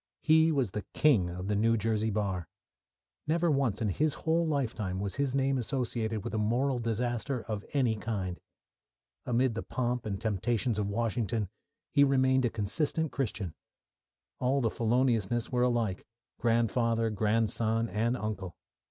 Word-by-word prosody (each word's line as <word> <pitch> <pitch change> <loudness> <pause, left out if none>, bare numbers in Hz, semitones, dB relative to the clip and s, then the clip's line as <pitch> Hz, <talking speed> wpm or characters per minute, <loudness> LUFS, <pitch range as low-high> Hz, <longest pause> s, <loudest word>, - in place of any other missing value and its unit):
He 160 +1 +5
was 135 -9 +1
the 105 - -3
king 115 -13 +4
of 90 +2 -5
the 105 - +1
New 115 +3 +3
Jersey 110 0 0
bar. 100 -5 -2 0.8
Never 170 +1 +2
once 130 -6 +1
in 105 - +1
his 150 - +1
whole 165 +1 +1
lifetime 110 -10 -1
was 100 -1 -2
his 140 +1 -1
name 135 -1 +2
associated 115 -4 -1
with - - -5
a 110 - 0
moral 125 +5 +1
disaster 120 +2 -1
of 105 -2 -4
any 125 -6 +2
kind. 95 -5 -3 0.9
Amid 125 0 +2
the 115 - -3
pomp 125 -2 -2
and 100 -2 -3
temptations 110 +1 0
of 100 - 0
Washington 110 -2 -1 0.4
he 140 -1 +5
remained 130 -1 +3
a - - +2
consistent 145 +9 -1
Christian. 105 - -3 0.9
All 130 +2 +2
the 115 -4 +1
Feloniousness 120 -1 +1
were 125 -1 +1
alike 120 -6 0 0.3
grandfather, 115 -1 +2
grandson, 110 +2 +1
and 115 +3 0
uncle. 100 -6 -4
115 Hz, 150 wpm, -30 LUFS, 105-130 Hz, 0.9 s, He